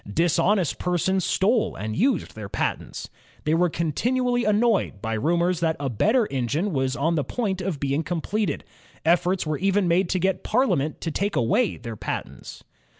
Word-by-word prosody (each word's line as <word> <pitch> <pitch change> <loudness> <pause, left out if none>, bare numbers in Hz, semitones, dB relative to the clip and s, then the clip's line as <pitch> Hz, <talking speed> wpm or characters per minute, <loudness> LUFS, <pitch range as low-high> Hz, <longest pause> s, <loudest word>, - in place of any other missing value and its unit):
Dishonest 175 - +2
persons 180 +1 0
stole 215 +7 +1
and 110 +2 -4
used 245 - +1
their 105 -2 -8
patents. - - -3 0.4
They 155 - +1
were 175 +2 +3
continually 245 - 0
annoyed 210 - +2
by 110 +2 -3
rumors 170 +8 +1
that 165 -2 0
JAMES - - -29
WATT 110 - -11
23 - - +3
a - - +5
better 245 -2 +3
engine 140 - -1
was 130 -1 0
on 160 +4 +1
the 150 -3 +1
point 190 - -2
of 180 -6 -3
being 140 +2 0
completed. 180 +6 -2 0.4
Efforts 175 +2 +2
were 155 -2 -2
even 195 0 +2
made 175 +1 +2
to 185 - +1
get 185 +1 0
Parliament 180 - +1
to 165 - -2
take 200 +6 -1
away 205 - +2
their 115 -2 -7
patents. - - -6
175 Hz, 180 wpm, -24 LUFS, 150-205 Hz, 0.4 s, a